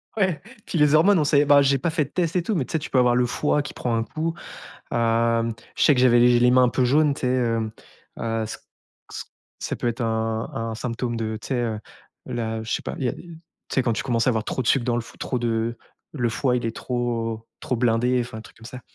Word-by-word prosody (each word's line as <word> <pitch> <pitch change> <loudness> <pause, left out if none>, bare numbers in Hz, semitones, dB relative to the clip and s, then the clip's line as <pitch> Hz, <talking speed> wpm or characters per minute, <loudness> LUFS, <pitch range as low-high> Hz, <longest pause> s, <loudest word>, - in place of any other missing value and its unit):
ouais, 190 -8 0 0.2
puis 170 - -3
les 150 0 +5
hormones, 180 +3 +5
on - - +2
sait 145 0 +3
bah, 140 0 +6
j'ai 140 0 +3
pas 165 - -1
fait 155 -3 0
de - - -15
test 175 +1 -1
et 180 - +3
tout, 210 +2 -1
mais 135 -6 0
tu - - -11
sais, 160 - 0
tu 150 - -7
peux 130 - 0
avoir 125 -1 +4
le 125 - +3
foie 150 +3 +1
qui 145 - -7
prend 120 -2 -2
un 115 - 0
coup. 160 +8 -3 0.6
Hem, 115 0 +1 0.2
je - - +1
sais 145 - +6
que 125 - 0
j'avais 120 -1 +5
les 120 +1 +6
j 120 -1 +4
les 125 0 +5
mains 130 0 +5
un 125 - +4
peu 125 +2 +1
jaunes, 145 +3 +3
tu - - -10
sais, 125 - 0
hem, 115 -3 0 0.5
heu, 115 -1 -1
ç 110 - -6 0.5
ç - - -6 0.4
ça - - -3
peut 120 - -3
être 120 +2 -2
un 110 0 -1
un 115 0 -3
symptôme 120 0 -3
de, 110 -1 -3
tu - - -10
sais, 130 - 0
heu, 115 -3 -1 0.5
là, 115 -2 -3
je 115 - -6
sais - - -1
pas, - - -5
il - - -4
y - - +2
a - - -1
des - - -11
tu 170 -1 -12
sais, - - +2
quand 120 -2 +1
tu - - -3
commences 120 -1 0
à - - +6
avoir 110 -3 0
trop 130 - -2
de 120 - -4
sucre 130 -3 +3
dans 120 -1 +1
le 120 - 0
f - - -15
trop 125 - -2
de 115 0 -1 0.4
le 120 -5 0
foie 125 +1 0
il 120 - -2
est 115 - -3
trop 115 -2 -3
trop 125 - -2
blindé, 120 +1 +2
enfin, 120 -2 -7
un - - -9
truc - - -16
comme 115 - -15
ça. 125 +1 -9
120 Hz, 280 wpm, -24 LUFS, 115-140 Hz, 0.6 s, bah